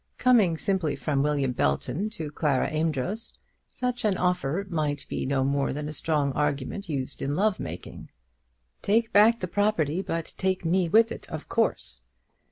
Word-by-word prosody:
Coming 220 Hz, -10 st, +4 dB
simply 185 Hz, -5 st, 0 dB
from 145 Hz, -3 st, 0 dB
William 140 Hz, -3 st, +1 dB
Belton 125 Hz, -, 0 dB
to 160 Hz, -8 st, -6 dB
Clara 145 Hz, -3 st, 0 dB
Amedroz, 160 Hz, -, -2 dB, 0.4 s
such 250 Hz, -1 st, -2 dB
an 205 Hz, -4 st, +2 dB
offer 180 Hz, 0 st, 0 dB
might 150 Hz, -5 st, -2 dB
be -, -, -3 dB
no 135 Hz, -1 st, +1 dB
more 140 Hz, 0 st, 0 dB
than 150 Hz, +1 st, -4 dB
a 155 Hz, -, -5 dB
strong 150 Hz, -3 st, 0 dB
argument 145 Hz, +6 st, -2 dB
used 135 Hz, -4 st, -4 dB
in 140 Hz, +1 st, -1 dB
love 205 Hz, +2 st, +1 dB
making. -, -, -7 dB, 0.7 s
"Take 225 Hz, +3 st, +1 dB
back 220 Hz, +3 st, +6 dB
the 185 Hz, -, -2 dB
property, 180 Hz, -4 st, +1 dB
but 165 Hz, -4 st, -4 dB
take 190 Hz, -2 st, 0 dB
me 175 Hz, +1 st, +2 dB
with 225 Hz, +4 st, +5 dB
it, -, -, -8 dB
of -, -, -6 dB
course." -, -, 0 dB
165 Hz, 165 wpm, -27 LUFS, 145-200 Hz, 0.7 s, back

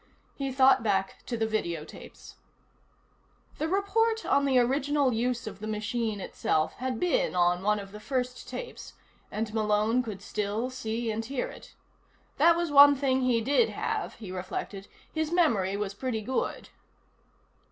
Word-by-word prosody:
He 275 Hz, -1 st, -3 dB
thought 265 Hz, 0 st, +5 dB
back 195 Hz, -3 st, -1 dB
to 235 Hz, -, -2 dB
the 225 Hz, -, +1 dB
video 170 Hz, -8 st, -2 dB
tapes. -, -, -13 dB, 1.2 s
The 315 Hz, -, 0 dB
report 440 Hz, +5 st, +1 dB
on 280 Hz, -, +3 dB
the 265 Hz, -2 st, +3 dB
original 270 Hz, +2 st, +2 dB
use 240 Hz, +2 st, -1 dB
of 200 Hz, -3 st, -7 dB
the 215 Hz, -, -6 dB
machine 215 Hz, 0 st, -2 dB
itself 155 Hz, -4 st, -1 dB
had 255 Hz, -2 st, -3 dB
been 350 Hz, -, +1 dB
on 175 Hz, 0 st, +3 dB
one 210 Hz, +2 st, +2 dB
of 200 Hz, -1 st, -8 dB
the 210 Hz, -, -9 dB
first 250 Hz, +1 st, -3 dB
tapes, -, -, -7 dB, 0.4 s
and 215 Hz, 0 st, -3 dB
Malone 215 Hz, +2 st, +2 dB
could 210 Hz, -5 st, -7 dB
still 210 Hz, +6 st, -2 dB
see 230 Hz, -2 st, -3 dB
and 220 Hz, +1 st, -3 dB
hear 260 Hz, +2 st, -3 dB
it. -, -, -13 dB, 0.6 s
That 335 Hz, 0 st, +6 dB
was 340 Hz, -2 st, -1 dB
one 285 Hz, 0 st, +9 dB
thing 265 Hz, -1 st, +1 dB
he 245 Hz, -3 st, +2 dB
did 285 Hz, -, +3 dB
have, -, -, -3 dB
he 205 Hz, -5 st, -9 dB
reflected; 190 Hz, +2 st, -5 dB, 0.3 s
his 315 Hz, 0 st, -1 dB
memory 215 Hz, -, +2 dB
was 205 Hz, -1 st, -3 dB
pretty 225 Hz, +1 st, -3 dB
good. 260 Hz, +4 st, -2 dB
235 Hz, 160 wpm, -28 LUFS, 210-275 Hz, 1.2 s, one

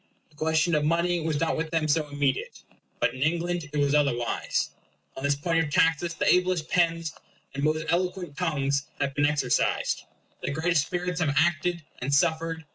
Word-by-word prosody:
The -, -, -25 dB
question 160 Hz, +2 st, +1 dB
of 150 Hz, -1 st, +2 dB
money 170 Hz, +3 st, +1 dB
was 160 Hz, -2 st, -1 dB
not 165 Hz, -, +1 dB
with 160 Hz, 0 st, -2 dB
them 160 Hz, -1 st, 0 dB
so 155 Hz, 0 st, +1 dB
immediate. 145 Hz, -2 st, -2 dB, 0.4 s
But -, -, +1 dB
in 130 Hz, -, -8 dB
England 170 Hz, +1 st, 0 dB
it 150 Hz, -, -3 dB
was 145 Hz, -1 st, +2 dB
otherwise. 140 Hz, -6 st, 0 dB, 0.4 s
On 135 Hz, -, -7 dB
this 145 Hz, 0 st, +2 dB
point 165 Hz, +3 st, +1 dB
of 150 Hz, -, -4 dB
taxes 165 Hz, +3 st, +2 dB
the -, -, -1 dB
ablest 180 Hz, -3 st, +1 dB
pens, 165 Hz, -2 st, +1 dB, 0.4 s
and 140 Hz, +1 st, -4 dB
most 155 Hz, +1 st, +1 dB
eloquent 180 Hz, -2 st, -1 dB
tongues, 140 Hz, -5 st, 0 dB
have 135 Hz, -1 st, -1 dB
been 145 Hz, +1 st, +2 dB
exercised; 150 Hz, -1 st, 0 dB, 0.4 s
the -, -, -2 dB
greatest 160 Hz, -1 st, +1 dB
spirits 180 Hz, -1 st, -2 dB
have 145 Hz, -4 st, +1 dB
acted 170 Hz, +1 st, +1 dB, 0.2 s
and 125 Hz, +3 st, -3 dB
suffered. 160 Hz, +2 st, +1 dB
160 Hz, 180 wpm, -27 LUFS, 145-170 Hz, 0.4 s, of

